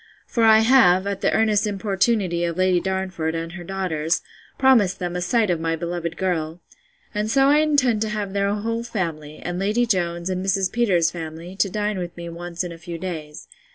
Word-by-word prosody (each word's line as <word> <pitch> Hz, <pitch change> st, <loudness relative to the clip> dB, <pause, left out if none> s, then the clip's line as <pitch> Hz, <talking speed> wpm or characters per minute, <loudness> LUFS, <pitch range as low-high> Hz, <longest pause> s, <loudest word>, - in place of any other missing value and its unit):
For 230 Hz, -, -1 dB
I 220 Hz, 0 st, +7 dB
have, 200 Hz, -7 st, +5 dB
at 200 Hz, -1 st, -3 dB
the -, -, +2 dB
earnest 215 Hz, -1 st, +2 dB
importunity 195 Hz, -3 st, 0 dB
of 170 Hz, 0 st, -2 dB
Lady 185 Hz, -1 st, +3 dB
Darnford, 185 Hz, -3 st, -2 dB
and 165 Hz, 0 st, -4 dB
her 175 Hz, 0 st, -8 dB
daughters, 175 Hz, -3 st, -1 dB, 0.3 s
promised 230 Hz, -9 st, +4 dB
them 175 Hz, -1 st, -4 dB
a 180 Hz, -, -2 dB
sight 210 Hz, +2 st, +2 dB
of 170 Hz, -, 0 dB
my 165 Hz, 0 st, -1 dB
beloved 170 Hz, 0 st, -4 dB
girl: 170 Hz, -3 st, -2 dB, 0.5 s
And 210 Hz, 0 st, -1 dB
so 270 Hz, +3 st, +4 dB
I 295 Hz, -, +5 dB
intend 280 Hz, -8 st, +2 dB
to 220 Hz, -, 0 dB
have 210 Hz, -2 st, -3 dB
their 200 Hz, 0 st, +1 dB
whole 230 Hz, +3 st, -2 dB
family, 165 Hz, -10 st, -4 dB
and 175 Hz, 0 st, -4 dB
Lady 210 Hz, +5 st, +1 dB
Jones, 175 Hz, -5 st, -1 dB
and 185 Hz, 0 st, -2 dB
Mrs. 195 Hz, -1 st, +1 dB
Peters's 190 Hz, -9 st, +2 dB
family, 165 Hz, +2 st, -7 dB
to 195 Hz, -, +2 dB
dine 210 Hz, 0 st, -2 dB
with 175 Hz, -1 st, -6 dB
me 170 Hz, 0 st, -6 dB
once 170 Hz, +1 st, -5 dB
in 175 Hz, -, -5 dB
a 165 Hz, -, -10 dB
few 170 Hz, 0 st, -7 dB
days. 160 Hz, -4 st, -7 dB
185 Hz, 200 wpm, -22 LUFS, 170-210 Hz, 0.5 s, I